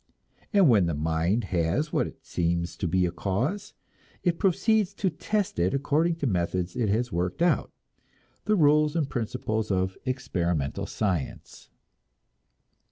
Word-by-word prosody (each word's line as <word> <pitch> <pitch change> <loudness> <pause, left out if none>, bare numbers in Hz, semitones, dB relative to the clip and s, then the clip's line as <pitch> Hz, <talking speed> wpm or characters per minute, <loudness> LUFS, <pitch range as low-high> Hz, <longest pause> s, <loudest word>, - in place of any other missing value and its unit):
And 200 -6 +5
when 105 -9 +5
the 85 - -1
mind 80 +8 0
has 90 - 0
what - - +1
seems 85 0 -1
to 95 - -2
be 90 +2 +2
a 85 - -1
cause, 120 - -2 0.5
it 175 -2 +1
proceeds 200 +1 +2
to 190 -3 0
test 200 - -2
it 90 +6 +2
according 155 +4 +1
to 165 - -4
methods 90 -4 -1
it 115 -4 0
has 120 +4 0
worked 90 - -1
out, 175 - +2 0.7
the 215 - +3
rules 150 -2 +4
and 160 -4 +1
principles 110 -4 -2
of 95 -1 0
experimental 90 - -1
science. 90 -9 -3
110 Hz, 140 wpm, -27 LUFS, -, 0.7 s, And